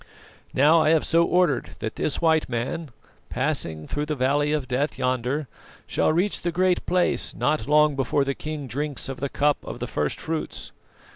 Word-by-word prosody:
"Now 155 +5 +5
I 155 - +3
have 160 -1 +3
so 165 +1 +4
ordered 175 -5 +1
that 110 - -5
this 150 - -1
white 160 -3 +2
man, 130 +7 -3 0.4
passing 105 - -2
through 145 0 -3
the 150 - -1
Valley 145 +3 +1
of 150 -4 -1
Death 130 +4 -1
yonder, 130 +3 -1 0.4
shall - - +1
reach 180 +6 0
the 175 - -1
Great 180 +1 +1
Place 180 0 +1
not 150 -1 0
long 150 0 +4
before 135 +1 +1
the 140 0 -1
king 150 0 -5
drinks 145 +2 -3
of 135 - -5
the 140 +1 -2
cup 145 +1 +2
of - - -7
the - - -4
first 75 -1 -2
fruits. 160 -1 -4
150 Hz, 185 wpm, -24 LUFS, 135-160 Hz, 0.4 s, Now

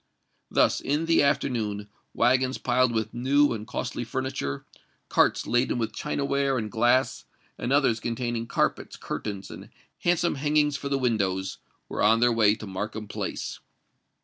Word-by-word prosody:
Thus, - - +3
in 150 +4 0
the 165 0 +4
afternoon, 110 -7 0 0.2
waggons 130 +1 +2
piled 125 0 +2
with 110 -1 -2
new 135 +3 +3
and 110 -1 -6
costly - - -3
furniture, 120 - -3 0.4
carts - - +3
laden 120 +1 +1
with 110 -2 -2
chinaware 140 -1 0
and 110 -3 -3
glass, 120 +3 +2 0.3
and 120 - -2
others 135 -5 +3
containing 120 0 -3
carpets, - - -1
curtains, 100 -2 -5
and - - -10 0.3
handsome 175 0 +2
hangings 150 -1 +2
for 140 - -4
the 140 - +1
windows, 95 -7 -1 0.3
were - - -4
on 110 +2 +5
their 120 0 +4
way 110 -2 +4
to 110 - -9
Markham 105 +2 -5
Place. - - -4
120 Hz, 150 wpm, -26 LUFS, 110-135 Hz, 0.4 s, on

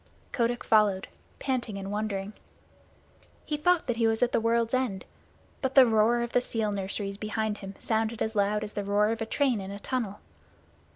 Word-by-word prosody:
Kotick 240 -1 0
followed, 205 -3 +3 0.3
panting 245 -6 -2
and 195 0 -5
wondering. 205 -1 -3 1.1
He 300 - -1
thought 350 +3 +2
that 245 -3 -1
he 230 -1 +3
was 225 +1 +1
at 245 - +2
the - - +2
world's 230 +1 +1
end, 250 -7 -1 0.6
but 265 0 -2
the 265 -2 +9
roar 225 +1 +3
of 240 - -4
the 245 - +4
seal 220 -3 -2
nurseries 200 0 -3
behind 215 0 -2
him 195 -1 -8
sounded 225 0 -1
as 220 0 -2
loud 210 +1 +1
as 210 - -7
the 205 - -3
roar 205 +1 +2
of 225 0 -3
a 225 - -2
train 255 -5 +1
in 190 - -7
a 200 - -6
tunnel. 210 -2 -3
220 Hz, 190 wpm, -28 LUFS, 205-240 Hz, 1.1 s, the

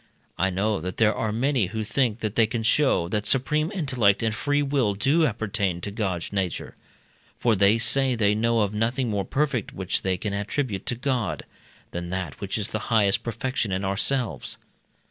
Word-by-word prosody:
I 95 +2 +1
know 100 +1 0
that 90 +2 -5
there 110 -1 +4
are 110 - -2
many 120 -1 +1
who 110 +3 -3
think 115 0 0
that 110 -2 -2
they 115 -1 +3
can 115 0 -3
show, 110 - +3
that 105 +1 -1
supreme 150 +5 +2
intellect 130 - +2
and 110 -1 +1
free 145 +5 0
will 135 -8 +1
do 145 +9 +3
appertain 105 -6 -1
to 100 - -4
God's 100 -5 -3
nature; 95 -5 -3 0.6
for 115 -2 +2
they 100 +3 +4
say 130 +2 +3
they 105 -3 +2
know 115 +1 +2
of 105 0 0
nothing 115 +3 0
more 100 -2 -1
perfect, 135 -2 -1
which 95 -1 -2
they 95 -1 0
can 100 +2 -3
attribute 100 +1 -2
to 125 - 0
God, 125 -3 -2 0.5
than 85 0 -5
that 90 -7 -4
which - - -2
is - - -2
the - - -3
highest 105 -3 +3
perfection 115 -1 -2
in 95 +1 -1
ourselves. 115 +5 -1
110 Hz, 185 wpm, -25 LUFS, 100-130 Hz, 0.6 s, there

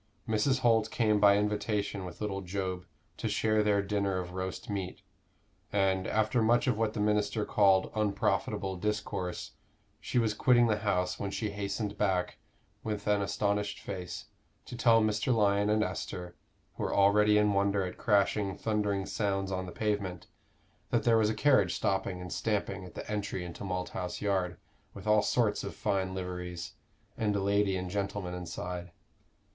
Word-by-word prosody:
Mrs. 130 +5 +1
Holt 115 -2 +3
came 110 -3 +2
by 100 0 +6
invitation 105 -1 -1
with 90 +2 -9
little 100 -2 -2
Job 95 -1 -4 0.3
to - - -2
share 110 -1 +2
their 105 -1 +2
dinner 100 -1 0
of 90 -1 -4
roast 95 0 -4
meat; 95 -3 -4 0.7
and, 95 -2 +1
after 110 +3 +1
much 120 +5 +3
of 125 -4 +2
what 110 0 0
the - - -4
minister 105 0 +1
called 95 -2 +3
unprofitable 100 -2 0
discourse, 100 -2 -3 0.5
she - - -3
was 115 -3 +3
quitting 120 +2 +4
the 105 -2 +1
house 90 -3 0
when 100 - -2
she 105 +1 -3
hastened 100 +1 -3
back 95 -3 0 0.4
with 105 -2 -3
an 105 -1 +2
astonished 100 +1 -1
face, 90 -3 -6 0.4
to - - -8
tell 115 -1 +5
Mr. 105 +3 +1
Lyon 100 -1 +3
and 110 0 +3
Esther, 90 -4 -5 0.4
who - - -3
were - - -1
already 105 +1 +5
in 105 -1 +3
wonder 100 0 +2
at 90 - -7
crashing, 100 -3 +2
thundering 105 -3 0
sounds 95 -1 -1
on 95 -1 -2
the - - -7
pavement, 100 -5 -2 0.6
that 120 -2 +1
there 115 -1 +4
was 105 -1 +3
a 110 - -1
carriage 110 -7 +3
stopping 95 -2 -1
and 90 -2 -6
stamping 100 -3 -2
at 90 - -12
the - - -6
entry 105 -3 -3
into 85 +3 -8
Malthouse 90 -1 -3
Yard, 95 -4 0 0.4
with - - -9
"all 105 0 +5
sorts 105 0 +1
of 100 - -6
fine 95 -3 -1
liveries," 90 -2 -5 0.5
and 105 -2 +1
a - - +1
lady 100 0 +2
and 90 -1 -4
gentleman 100 -2 -3
inside. 90 0 -5
100 Hz, 165 wpm, -30 LUFS, 95-105 Hz, 0.7 s, by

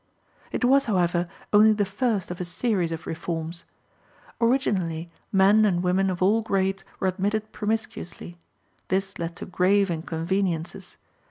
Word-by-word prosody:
It - - 0
was, 275 +2 +4
however, 175 -4 +1 0.3
only 215 +1 +7
the 205 -1 +1
first 200 -1 -1
of 180 - -5
a - - 0
series 180 -2 0
of 165 0 -5
reforms. 165 0 -4 0.8
Originally, 185 -10 +1 0.2
men 200 +2 +5
and 180 -4 +2
women 190 +2 +2
of 185 -1 -1
all 215 +4 +4
grades 195 -2 0 0.2
were 190 - +1
admitted 205 +4 -1
promiscuously. 210 -5 -4 0.5
This 190 +1 -1
led 170 0 -4
to - - -7
grave 190 +1 +2
inconveniences. 165 +1 -2
190 Hz, 140 wpm, -25 LUFS, 175-210 Hz, 0.8 s, only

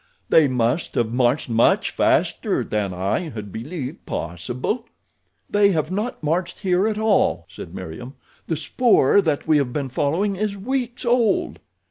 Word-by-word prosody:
"They 160 -3 +6
must 125 +4 0
have 115 -1 0
marched 125 +3 +2
much 115 -1 +3
faster - - +1
than 105 -2 -2
I 95 +3 -1
had 105 -6 -7
believed 135 - -6
possible." 120 - -3 0.6
"They 205 -1 +3
have 155 0 -1
not 210 0 -3
marched 170 +4 -1
here 190 +1 +2
at 215 -1 -1
all," 215 -2 +2
said - - -10
Meriem. 120 - -8 0.3
"The 160 - -1
spoor 205 - +3
that 155 -6 -1
we 155 -1 +5
have 140 -4 0
been 140 0 -3
following 165 +10 0
is 205 0 -2
weeks 245 +3 -3
old." 235 -4 +1
155 Hz, 150 wpm, -22 LUFS, 120-205 Hz, 0.6 s, They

